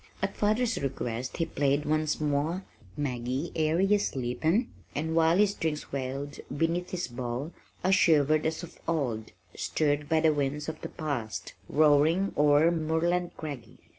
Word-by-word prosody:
At -, -, -2 dB
father's 220 Hz, +3 st, +1 dB
request 125 Hz, -2 st, -3 dB
he 165 Hz, -, +1 dB
played 145 Hz, -2 st, 0 dB
once 155 Hz, 0 st, +1 dB
more 155 Hz, +5 st, 0 dB, 0.3 s
Maggie, 130 Hz, +2 st, -2 dB
Air 160 Hz, +1 st, +2 dB
Ye 200 Hz, +2 st, +4 dB
Sleepin', 155 Hz, -, 0 dB, 0.3 s
and 160 Hz, +2 st, -1 dB
while 165 Hz, +1 st, +4 dB
the 210 Hz, -, +6 dB
strings 160 Hz, -6 st, -3 dB
wailed 140 Hz, +1 st, -4 dB, 0.2 s
beneath 170 Hz, +3 st, 0 dB
his 180 Hz, -1 st, -3 dB
bow 125 Hz, +4 st, -4 dB, 0.3 s
I 185 Hz, -, +3 dB
shivered 155 Hz, -5 st, +4 dB
as 160 Hz, +2 st, -3 dB
of 175 Hz, -, -11 dB
old, 125 Hz, -10 st, -1 dB, 0.2 s
stirred 145 Hz, -1 st, 0 dB
by 160 Hz, -1 st, +3 dB
the 160 Hz, -1 st, +4 dB
winds 145 Hz, +1 st, -1 dB
of 160 Hz, -1 st, -5 dB
the -, -, -5 dB
past 115 Hz, -, -4 dB, 0.2 s
"roaring 155 Hz, +5 st, +4 dB
o'er 150 Hz, +3 st, +5 dB
Moorland 170 Hz, +2 st, 0 dB
craggy." 140 Hz, -7 st, -7 dB
155 Hz, 150 wpm, -29 LUFS, 140-165 Hz, 0.3 s, the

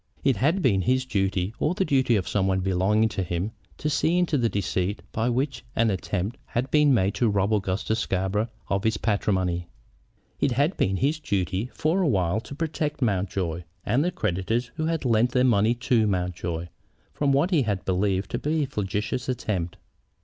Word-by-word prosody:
It -, -, +3 dB
had 160 Hz, -, +2 dB
been 100 Hz, -8 st, +3 dB
his 130 Hz, +5 st, +1 dB
duty, 95 Hz, -3 st, 0 dB
or 170 Hz, -, +1 dB
the 190 Hz, -, +1 dB
duty 130 Hz, -6 st, +3 dB
of 95 Hz, -, -1 dB
some 95 Hz, -2 st, +1 dB
one 95 Hz, 0 st, +1 dB
belonging 95 Hz, +4 st, +2 dB
to 100 Hz, -, -3 dB
him, 90 Hz, +3 st, -2 dB, 0.3 s
to -, -, -3 dB
see 160 Hz, +3 st, +2 dB
into 175 Hz, -3 st, +2 dB
the 120 Hz, -4 st, +2 dB
deceit 100 Hz, 0 st, -1 dB
by 115 Hz, +2 st, 0 dB
which 125 Hz, 0 st, -1 dB
an 115 Hz, -1 st, +3 dB
attempt 100 Hz, +4 st, -2 dB
had 125 Hz, +2 st, -2 dB
been 150 Hz, -1 st, +5 dB
made 100 Hz, -6 st, +3 dB
to 110 Hz, +2 st, +2 dB
rob 100 Hz, +1 st, +1 dB
Augustus 105 Hz, +2 st, 0 dB
Scarborough 95 Hz, +2 st, 0 dB, 0.2 s
of 100 Hz, 0 st, 0 dB
his 110 Hz, -2 st, +1 dB
patrimony. 95 Hz, -5 st, 0 dB, 0.7 s
It 140 Hz, -3 st, +2 dB
had 145 Hz, +9 st, +1 dB
been 95 Hz, -1 st, +1 dB
his 150 Hz, -, +1 dB
duty, 100 Hz, -, -1 dB
for 165 Hz, +5 st, +1 dB
a 180 Hz, -, +2 dB
while, 95 Hz, -, +1 dB
to 120 Hz, +5 st, -9 dB
protect 150 Hz, -2 st, -2 dB
Mountjoy, 95 Hz, -5 st, -1 dB, 0.2 s
and 125 Hz, +7 st, +2 dB
the 175 Hz, -, +1 dB
creditors 115 Hz, -, -1 dB
who 155 Hz, -, -2 dB
had 165 Hz, -3 st, -1 dB
lent 120 Hz, 0 st, +3 dB
their 125 Hz, -, +3 dB
money 115 Hz, -2 st, +3 dB
to 115 Hz, -2 st, +2 dB
Mountjoy, 85 Hz, -3 st, -2 dB, 0.4 s
from 145 Hz, -2 st, +1 dB
what 145 Hz, +7 st, +2 dB
he 165 Hz, -5 st, +4 dB
had 105 Hz, -6 st, -2 dB
believed 95 Hz, +1 st, 0 dB
to 120 Hz, -, -1 dB
be 155 Hz, +1 st, 0 dB
a -, -, 0 dB
flagitious 105 Hz, 0 st, -3 dB
attempt. 95 Hz, -8 st, -2 dB
110 Hz, 190 wpm, -25 LUFS, 95-130 Hz, 0.7 s, been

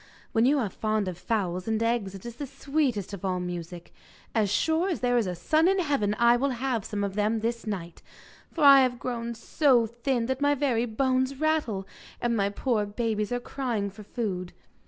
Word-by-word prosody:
'When 225 Hz, +2 st, +3 dB
you 290 Hz, +2 st, +4 dB
are 220 Hz, -8 st, -1 dB
fond 215 Hz, -1 st, -1 dB
of 185 Hz, -, -3 dB
fowls 180 Hz, 0 st, -2 dB
and 220 Hz, 0 st, 0 dB
eggs 230 Hz, -4 st, 0 dB
it 195 Hz, -, -11 dB
is 235 Hz, 0 st, -7 dB
the 285 Hz, -, -5 dB
sweetest 270 Hz, -, -1 dB
of 200 Hz, -, -7 dB
all 185 Hz, -1 st, 0 dB
music. 175 Hz, -1 st, -6 dB, 0.4 s
As 215 Hz, -4 st, +1 dB
sure 320 Hz, -, +1 dB
as 350 Hz, -, -2 dB
there 245 Hz, -1 st, +2 dB
is 235 Hz, -5 st, +2 dB
a 180 Hz, -, -3 dB
sun 310 Hz, -, +2 dB
in 385 Hz, +1 st, +3 dB
heaven 280 Hz, -, +1 dB
I 235 Hz, 0 st, +5 dB
will 280 Hz, +3 st, +1 dB
have 250 Hz, -4 st, -1 dB
some 205 Hz, 0 st, -3 dB
of 200 Hz, -1 st, -2 dB
them 215 Hz, +2 st, 0 dB
this 230 Hz, 0 st, -2 dB
night, 175 Hz, -5 st, -5 dB, 0.5 s
for 325 Hz, -, -2 dB
I 280 Hz, -1 st, +9 dB
have 250 Hz, -1 st, +1 dB
grown 235 Hz, -1 st, -4 dB
so 245 Hz, +1 st, +3 dB
thin 235 Hz, +2 st, -1 dB
that 260 Hz, +2 st, -2 dB
my 285 Hz, 0 st, +3 dB
very 250 Hz, -4 st, +1 dB
bones 260 Hz, +3 st, 0 dB
rattle, 300 Hz, -12 st, 0 dB, 0.3 s
and 240 Hz, -1 st, 0 dB
my 200 Hz, -2 st, +1 dB
poor 210 Hz, 0 st, 0 dB
babies 215 Hz, 0 st, -2 dB
are 245 Hz, -, 0 dB
crying 240 Hz, -6 st, -3 dB
for 205 Hz, +2 st, -12 dB
food. 195 Hz, -5 st, -4 dB
230 Hz, 205 wpm, -27 LUFS, 205-260 Hz, 0.5 s, I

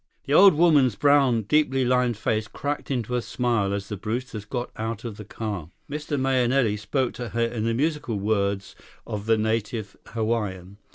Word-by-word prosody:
The 140 Hz, -, -1 dB
old 190 Hz, +1 st, +8 dB
woman's 145 Hz, -8 st, +4 dB
brown, 135 Hz, -5 st, +4 dB
deeply 135 Hz, +2 st, +2 dB
lined 125 Hz, -2 st, +2 dB
face 110 Hz, 0 st, -1 dB
cracked 145 Hz, +4 st, -4 dB
into 125 Hz, -3 st, -2 dB
a 125 Hz, -, +1 dB
smile 115 Hz, -5 st, 0 dB
as 100 Hz, 0 st, -3 dB
the 105 Hz, -, -4 dB
Brewsters 110 Hz, +1 st, -4 dB
got 120 Hz, +2 st, -4 dB
out 110 Hz, 0 st, -4 dB
of 115 Hz, -4 st, -6 dB
the 105 Hz, -, -7 dB
car. 100 Hz, -7 st, -5 dB, 0.2 s
Mr. 150 Hz, -1 st, -3 dB
Mahenili 130 Hz, -3 st, +2 dB
spoke 125 Hz, +5 st, -1 dB
to 120 Hz, -1 st, -6 dB
her 115 Hz, +2 st, 0 dB
in 115 Hz, -1 st, -3 dB
the 115 Hz, 0 st, +1 dB
musical 145 Hz, -5 st, -1 dB
words 100 Hz, -1 st, -1 dB, 0.3 s
of 105 Hz, 0 st, -5 dB
the 115 Hz, 0 st, +4 dB
native 110 Hz, -1 st, -2 dB
Hawaiian. 105 Hz, -4 st, -2 dB
115 Hz, 175 wpm, -25 LUFS, 105-130 Hz, 0.3 s, old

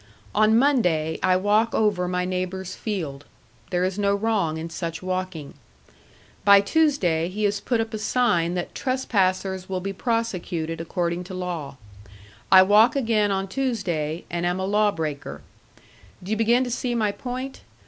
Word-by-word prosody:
On 215 Hz, +1 st, +4 dB
Monday 180 Hz, -, +2 dB
I 185 Hz, -1 st, +3 dB
walk 210 Hz, +4 st, +2 dB
over 205 Hz, -5 st, +1 dB
my 180 Hz, 0 st, -1 dB
neighbor's 185 Hz, 0 st, -3 dB
field; 160 Hz, -10 st, -4 dB, 0.5 s
there 180 Hz, 0 st, 0 dB
is 190 Hz, +2 st, -1 dB
no 200 Hz, 0 st, +2 dB
wrong 200 Hz, -7 st, 0 dB
in 160 Hz, +1 st, -5 dB
such 165 Hz, 0 st, -5 dB
walking. 185 Hz, -5 st, -4 dB, 0.9 s
By 200 Hz, 0 st, +8 dB
Tuesday 200 Hz, -, +1 dB
he 210 Hz, +3 st, -4 dB
has 205 Hz, -1 st, +1 dB
put 235 Hz, +2 st, -1 dB
up 225 Hz, 0 st, -2 dB
a 215 Hz, -, -3 dB
sign 210 Hz, -7 st, +1 dB
that 175 Hz, -, -4 dB
trespassers 190 Hz, -8 st, -1 dB
will 185 Hz, -1 st, -2 dB
be 195 Hz, +2 st, -4 dB
prosecuted 185 Hz, -8 st, -2 dB
according 170 Hz, +1 st, -2 dB
to 185 Hz, 0 st, -8 dB
law. 170 Hz, -7 st, -5 dB, 0.7 s
I 185 Hz, 0 st, +9 dB
walk 210 Hz, +6 st, +5 dB
again 225 Hz, -6 st, +2 dB
on 195 Hz, 0 st, -1 dB
Tuesday, 185 Hz, -, -2 dB
and 175 Hz, 0 st, -2 dB
am 175 Hz, +1 st, 0 dB
a 190 Hz, -, -1 dB
law 210 Hz, +2 st, +3 dB
breaker. 145 Hz, -, -5 dB, 0.8 s
Do 190 Hz, -, -6 dB
you -, -, +2 dB
begin 235 Hz, +3 st, +3 dB
to 245 Hz, -, -4 dB
see 240 Hz, 0 st, -2 dB
my 215 Hz, -3 st, +1 dB
point? 255 Hz, +4 st, -6 dB
190 Hz, 160 wpm, -24 LUFS, 175-220 Hz, 0.9 s, I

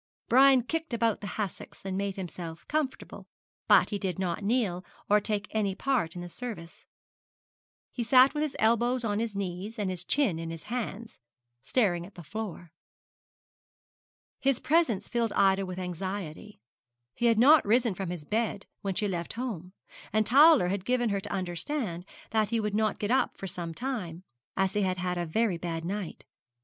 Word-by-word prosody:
Brian 265 Hz, 0 st, +6 dB
kicked 320 Hz, 0 st, -3 dB
about 230 Hz, -2 st, +1 dB
the 205 Hz, -, -5 dB
hassocks, 200 Hz, -2 st, -5 dB
and 190 Hz, -1 st, -2 dB
made 200 Hz, 0 st, -2 dB
himself 170 Hz, -3 st, -7 dB
comfortable; 295 Hz, -3 st, -3 dB, 0.4 s
but -, -, +5 dB
he 205 Hz, -, -1 dB
did 185 Hz, -4 st, -2 dB
not 185 Hz, +1 st, -2 dB
kneel, 200 Hz, -5 st, 0 dB, 0.3 s
or 210 Hz, -, +7 dB
take 210 Hz, -1 st, -1 dB
any 205 Hz, -3 st, 0 dB
part 235 Hz, -10 st, 0 dB
in 175 Hz, -, -5 dB
the 175 Hz, -, -6 dB
service. 175 Hz, -4 st, -8 dB, 1.0 s
He 245 Hz, -, -4 dB
sat 255 Hz, +3 st, +6 dB
with 300 Hz, -, -1 dB
his 305 Hz, -2 st, -2 dB
elbows 240 Hz, +3 st, +2 dB
on 210 Hz, -2 st, 0 dB
his 225 Hz, -2 st, -2 dB
knees, 195 Hz, +3 st, -4 dB
and 200 Hz, -3 st, -1 dB
his 180 Hz, -1 st, -5 dB
chin 210 Hz, -, +1 dB
in 165 Hz, 0 st, -5 dB
his 165 Hz, -1 st, -7 dB
hands, 230 Hz, -1 st, -5 dB, 0.4 s
staring 185 Hz, -9 st, +1 dB
at 195 Hz, +3 st, -13 dB
the 175 Hz, -, -10 dB
floor. 175 Hz, -2 st, -6 dB, 1.7 s
His 275 Hz, -2 st, +2 dB
presence 300 Hz, -, +2 dB
filled 235 Hz, -2 st, 0 dB
Ida 195 Hz, 0 st, +3 dB
with 185 Hz, 0 st, -6 dB
anxiety. 185 Hz, +1 st, -5 dB, 0.5 s
He 240 Hz, -, +1 dB
had 230 Hz, -2 st, +4 dB
not 285 Hz, +7 st, +7 dB
risen 230 Hz, +1 st, +2 dB
from 185 Hz, -1 st, -4 dB
his 175 Hz, -4 st, -6 dB
bed 215 Hz, +1 st, -1 dB, 0.2 s
when 195 Hz, -2 st, -2 dB
she 210 Hz, -, 0 dB
left 175 Hz, -3 st, -3 dB
home, 210 Hz, -7 st, -5 dB, 0.4 s
and 215 Hz, 0 st, +2 dB
Towler 280 Hz, -, +6 dB
had 195 Hz, 0 st, -2 dB
given 245 Hz, +1 st, +1 dB
her 200 Hz, -1 st, 0 dB
to -, -, -7 dB
understand 185 Hz, -, -3 dB, 0.2 s
that 215 Hz, -2 st, +2 dB
he 230 Hz, 0 st, +1 dB
would 210 Hz, -1 st, -2 dB
not 215 Hz, 0 st, +1 dB
get 210 Hz, +2 st, -2 dB
up 260 Hz, -, +2 dB
for -, -, -6 dB
some 175 Hz, -2 st, -4 dB
time, 190 Hz, -10 st, -4 dB, 0.3 s
as 190 Hz, 0 st, +1 dB
he 210 Hz, -, +1 dB
had 185 Hz, -1 st, 0 dB
had 180 Hz, 0 st, -2 dB
a 175 Hz, -, -2 dB
very 195 Hz, 0 st, +1 dB
bad 165 Hz, -1 st, -4 dB
night. 195 Hz, 0 st, -5 dB
205 Hz, 180 wpm, -29 LUFS, 180-235 Hz, 1.7 s, or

